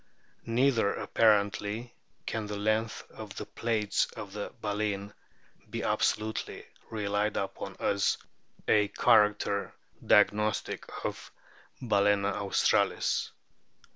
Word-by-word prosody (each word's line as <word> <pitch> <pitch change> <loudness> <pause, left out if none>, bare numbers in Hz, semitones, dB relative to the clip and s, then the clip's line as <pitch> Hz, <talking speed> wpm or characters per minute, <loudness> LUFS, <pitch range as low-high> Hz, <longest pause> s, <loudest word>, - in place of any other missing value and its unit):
J - - -6
Neither 120 -5 +3
apparently 105 +2 +1 0.3
can 110 -2 -3
the 105 0 -4
length 110 +2 0
of - - -9
the - - -5
plates 110 -3 0
of 100 -2 -7 0.3
baleen 105 -1 -2 0.6
be - - -4
absolutely 110 +1 -1 0.2
relied 105 -1 -1
upon 95 0 -4
as 100 0 +1 0.5
a 105 -1 +4
character 105 -2 +2 0.3
diagnostic 105 +1 +2 0.2
of - - -5 0.5
Balcena 100 -2 +2
australis. 100 -1 +1
105 Hz, 95 wpm, -30 LUFS, 100-110 Hz, 0.6 s, a